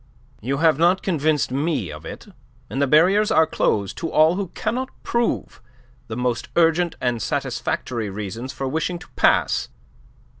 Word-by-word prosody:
"You 135 +5 -1
have 160 -1 +3
not 175 +3 +3
convinced 155 -6 +1
me 140 - -1
of 75 0 -9
it, - - -9 0.5
and 135 - -2
the 140 - +3
barriers 185 +9 +4
are 160 - +5
closed 100 -9 -1
to 165 -1 -3
all 155 +2 +5
who 195 +1 -2
cannot 250 +4 -2
prove 235 0 -1 0.5
the 110 - -5
most 125 -1 -2
urgent 170 +1 +3
and 120 -2 -1
satisfactory 115 +1 -2
reasons 105 +6 -5
for 135 - -4
wishing 160 +5 -1
to 175 - -13
pass. - - +2
155 Hz, 155 wpm, -22 LUFS, 125-170 Hz, 0.5 s, are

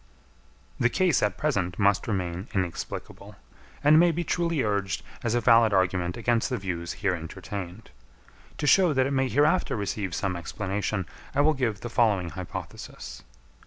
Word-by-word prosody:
The 125 - +3
case 175 +2 +2
at 105 -3 0
present 100 -12 -1
must 100 -1 +2
remain 95 -1 -2
inexplicable; 90 -3 -4 0.5
and 150 +2 +7
may 175 +1 +6
be 170 +2 -2
truly 170 -3 0
urged 100 -3 -1 0.2
as 115 0 0
a 120 - +2
valid 115 -3 +5
argument 90 -2 +1
against 120 +1 +1
the 125 - -1
views 85 -4 -4
here 95 - +3
entertained. 90 +2 -7 0.7
To - - -2
show 175 +3 +5
that 130 -1 +2
it 135 - -1
may 135 -1 +1
hereafter 150 +6 +2
receive 100 -3 -3
some 95 -2 -1
explanation, 95 +3 -3 0.3
I 140 - +4
will 155 +2 +4
give 115 -7 -2
the - - -4
following 100 -9 +2
hypothesis. 90 -3 -8
105 Hz, 160 wpm, -26 LUFS, 95-130 Hz, 0.7 s, and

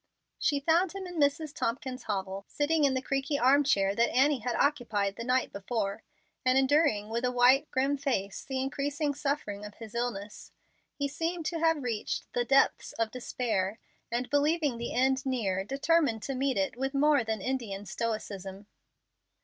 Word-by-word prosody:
She 290 -2 +2
found 335 +5 +2
him 390 -1 -6
in 355 -2 -6
Mrs. 285 +1 +1
Tompkins's 255 -2 -3
hovel, 195 -1 -3
sitting 300 +1 +1
in 270 -1 +2
the 260 - -1
creaky 275 +2 -1
arm 280 +3 +5
chair 195 -8 +2
that 235 +3 +2
Annie 275 +1 +3
had 240 +1 -2
occupied 225 -9 +1
the 230 - -6
night 255 +2 +1
before, 200 0 -3 0.4
and 255 0 +3
enduring 265 -6 +3
with 230 +2 -2
a 250 - +1
white, 255 +4 +4
grim 275 +2 +1
face 245 -9 -2
the 265 -1 -3
increasing 285 +2 -1
suffering 275 -8 -3
of 210 0 -9
his 225 -2 -10
illness. 230 -4 -4 0.4
He 285 - -1
seemed 330 +3 -3
to 330 +1 -2
have 325 -3 +2
reached 230 -4 -3
the 245 - +1
depths 270 +3 +2
of 225 -1 -1
despair, 220 -5 -2 0.3
and, 245 +1 -1
believing 290 -3 +2
the 235 - -4
end 265 +1 +2
near, 210 -8 -1
determined 275 -1 +1
to 275 - -3
meet 265 -2 0
it 195 +2 0
with 270 +2 -2
more 290 -2 +4
than 220 -1 -2
Indian 210 -4 -3
stoicism. 200 -2 -4
255 Hz, 175 wpm, -29 LUFS, 220-285 Hz, 0.4 s, arm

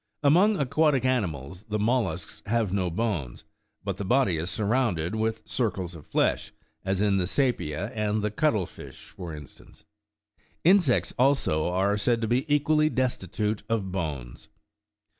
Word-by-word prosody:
Among 185 +9 +5
aquatic 140 -1 +2
animals, 90 - -1
the 105 - 0
mollusks 105 -7 -1
have 110 -3 0
no 95 -3 0
bones, 85 - -3 0.4
but - - -3
the - - -4
body 120 -4 +2
is 85 +3 -2
surrounded 105 -6 0
with 110 0 -1
circles 95 -7 -2
of 80 -4 -12
flesh, - - 0 0.3
as 95 +1 0
in 100 -2 +3
the 90 -2 0
seepia 105 - -1
and 105 -1 -1
the 105 - 0
cuttle 110 - +1
fish, 80 +1 -12
for 90 -5 -8
instance; 75 -3 -14 0.8
insects, 175 -7 +4
also, 125 - +2
are 100 +3 +1
said 115 +2 +2
to 110 - 0
be 130 +6 0
equally 150 +1 +3
destitute 110 - -1
of 105 -5 -1
bones. 75 -10 -5
105 Hz, 145 wpm, -27 LUFS, 90-125 Hz, 0.8 s, Among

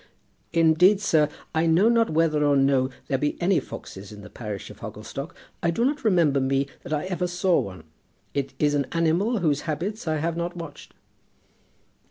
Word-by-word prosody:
"Indeed, 165 +5 +5
sir, 160 -7 +3 0.2
I 160 +1 +2
know 170 +6 +4
not 230 -1 +3
whether 155 -1 +2
or 145 -1 +4
no 135 -1 +3 0.2
there 135 - 0
be 145 +1 -1
any 180 0 +3
foxes 95 +1 -9
in 105 -1 -10
the - - -12
parish 105 -4 -6
of - - -14
Hogglestock. - - -7 0.3
I 170 - +1
do 230 +8 +1
not 290 +2 -1
remember 170 -10 +3
me 135 +1 +1 0.2
that - - -10
I 150 +2 0
ever 180 -1 -1
saw 180 0 +2
one. 95 -2 -6 0.5
It 140 -1 -3
is 145 -1 +2
an 140 -2 0
animal 175 +7 +1
whose 150 -4 +1
habits 185 +6 -3
I 155 0 +1
have 165 +2 -1
not 170 +1 -3
watched." 165 -4 -9
160 Hz, 185 wpm, -25 LUFS, 140-180 Hz, 0.5 s, Indeed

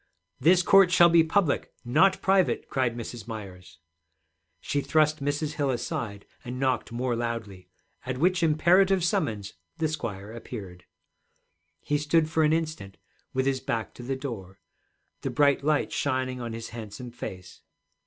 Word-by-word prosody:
'This 180 +2 +5
court 195 -1 +6
shall 175 -1 +7
be 165 -1 +6
public, 165 -1 +1
not 160 +11 +4
private,' 190 -1 +2
cried 125 -3 0
Mrs. 120 0 -7
Myers. 95 -5 -9 0.8
She 145 +10 -1
thrust 155 -1 +2
Mrs. 145 +1 -1
Hill 145 -2 -1
aside 110 -4 -3 0.2
and 125 0 -6
knocked 130 -5 0
more 120 +1 -1
loudly, 110 -6 -5 0.3
at 130 0 -4
which 180 +5 +2
imperative 175 +4 +4
summons 115 - -1 0.2
the 160 - +1
squire 105 -9 -5
appeared. 95 -7 -9 1.0
He 145 0 0
stood 155 +1 +2
for 160 - +2
an 155 -1 +4
instant 155 -12 -2 0.3
with 130 0 0
his 135 -1 +1
back 115 -3 -3
to - - -11
the 130 +2 -3
door, 110 -9 -7 0.6
the - - -2
bright 140 -1 +3
light 150 0 +1
shining 130 -2 -1
on 115 -1 -5
his 115 0 -6
handsome 115 +1 -8
face. 95 -6 -9
130 Hz, 150 wpm, -27 LUFS, 115-155 Hz, 1.0 s, shall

